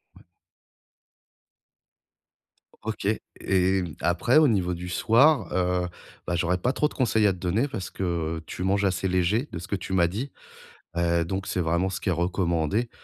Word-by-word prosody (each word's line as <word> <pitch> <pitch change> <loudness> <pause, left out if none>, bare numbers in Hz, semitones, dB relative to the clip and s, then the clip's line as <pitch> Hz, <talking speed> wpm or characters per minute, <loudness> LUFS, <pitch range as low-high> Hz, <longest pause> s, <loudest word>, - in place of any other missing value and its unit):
Ouais. - - -18 2.6
O 110 - -4
OK 105 -2 -3 0.3
et 95 0 +2 0.2
après 95 - +2
au 155 -1 +7
niveau 95 -7 +1
du 90 +1 -6
soir, 130 - +4
heu, 90 -1 +1 0.4
bah, 85 - -1
j'aurais 85 +1 +1
pas 125 +8 0
trop 150 - +2
de - - -12
conseils 110 -4 +2
à 100 - +2
te - - -10
donner, 95 +9 0
parce 110 -10 -5
que, - - -5 0.3
heu, 80 - -8
tu 90 - -6
manges 100 +2 +2
assez 95 0 0
léger 95 - +1
de 85 - -5
ce 85 - -8
que - - -1
tu 95 0 -5
m'as 85 -2 +4
dit. 115 +10 -4 0.7
Heu, 85 0 +2
donc 95 +3 -3
c'est 90 - -1
vraiment 85 +3 +1
ce 95 - -4
qui - - -1
est - - +3
recommandé. 85 +4 0
95 Hz, 185 wpm, -26 LUFS, 90-105 Hz, 2.6 s, au